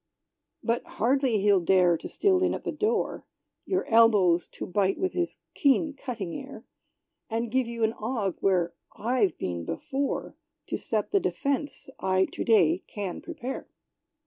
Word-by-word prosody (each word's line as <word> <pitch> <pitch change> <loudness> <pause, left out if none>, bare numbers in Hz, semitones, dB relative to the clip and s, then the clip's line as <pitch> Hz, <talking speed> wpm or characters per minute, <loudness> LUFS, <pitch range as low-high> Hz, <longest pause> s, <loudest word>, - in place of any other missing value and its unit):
But 235 +1 0
hardly 250 -2 +2
he'll 200 -1 +5
dare 180 -1 +4
to - - -6
steal 385 -2 +2
in 370 - +2
at - - -7
the - - -2
door, 435 +1 -1 0.4
Your 375 - 0
elbows 205 -7 +5
to - - -5
bite 195 +1 +1
with 375 -1 -1
his 350 -1 -2 0.2
keen 290 +1 +2
cutting 230 -10 -5
air, 270 -5 -8 0.7
And 230 0 -2
give 260 -1 +1
you 235 -1 -3
an 220 0 +2
ague, 220 -6 -1
where 180 -3 +2 0.2
I've 225 -5 +1
been 85 -2 -3
before, 275 - -3 0.4
To - - -1
set 215 -2 -2
the 400 - +4
defence 285 -5 -2
I 190 0 +2
to - - -3
day 180 -6 +4
can 200 -4 -5
prepare. 280 -6 -6
230 Hz, 155 wpm, -27 LUFS, 190-275 Hz, 0.7 s, he'll